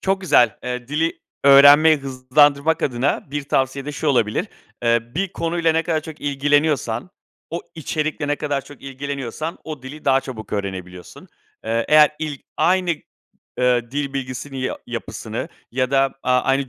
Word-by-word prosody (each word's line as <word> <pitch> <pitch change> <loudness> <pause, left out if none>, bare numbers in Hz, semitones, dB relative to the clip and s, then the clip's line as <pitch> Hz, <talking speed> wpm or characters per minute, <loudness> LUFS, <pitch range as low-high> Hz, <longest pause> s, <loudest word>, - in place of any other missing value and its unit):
Çok 195 0 0
güzel, 140 - +4
eee, 125 0 -4
dili 160 +3 -1 0.2
öğrenmeyi 145 +3 +8
hızlandırmak 140 +3 +2
adına 130 +2 -1
bir 145 0 -2
tavsiye 135 0 0
de 150 - -5
şu 150 - -4
olabilir: 115 -6 +1 0.3
Eee, 115 0 +3
bir 190 +3 -1
konuyla 165 -1 0
ne 165 +1 +1
kadar 160 -2 0
çok 155 0 -10
ilgileniyorsan, 145 -1 0 0.4
o 170 - -3
içerikle 155 -1 -3
ne 145 - +1
kadar 145 -2 -2
çok 145 -2 -14
ilgileniyorsan, 140 +2 -5
o 150 -5 -7
dili 145 +4 -10
daha 135 -1 +4
çabuk 115 -6 -9
öğrenebiliyorsun. 95 -3 -6 0.4
Eee, 115 +1 0
eğer 150 -1 +7
ilk, 150 -3 -4 0.2
aynı, 180 +2 +2 0.7
ııı, 125 -1 +2
dil 140 -1 -3
bilgisini 135 0 -5
ya 130 - -3
yapısını, - - -5 0.2
ya 130 0 0
da 135 -1 +2
a 125 0 +3
aynı 135 0 0
140 Hz, 155 wpm, -21 LUFS, 130-155 Hz, 0.7 s, öğrenmeyi